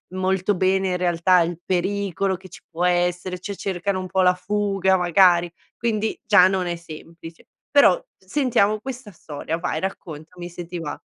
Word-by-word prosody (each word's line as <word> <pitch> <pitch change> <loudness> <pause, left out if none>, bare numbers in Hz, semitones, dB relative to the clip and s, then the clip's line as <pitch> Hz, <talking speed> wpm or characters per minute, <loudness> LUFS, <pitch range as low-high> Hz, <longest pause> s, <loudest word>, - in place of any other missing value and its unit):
molto 185 +1 0
bene 190 0 +1
in 180 - 0
realtà 180 +1 +3
il 170 0 -1
pericolo 190 0 -1
che 185 +1 -13
ci - - -12
può 170 +1 -3
essere, 180 +1 0
cioè 200 +2 -6
cercano 190 0 -2
un 185 - -6
po' 190 +1 +1
la 180 0 +5
fuga 195 0 0
magari. 175 0 +4 0.3
Quindi 220 -2 -1
già 185 -3 +6
non 190 -1 -1
è 175 - -2
semplice. 165 0 -12 0.2
Però 280 - +5
sentiamo 215 -1 +1
questa 255 -3 -7
storia, 160 0 -5
vai 165 -2 -2
raccontami 175 -1 -7
se 175 0 -8
ti 175 +1 -7
va. 165 -3 -6
185 Hz, 165 wpm, -22 LUFS, 175-195 Hz, 0.3 s, già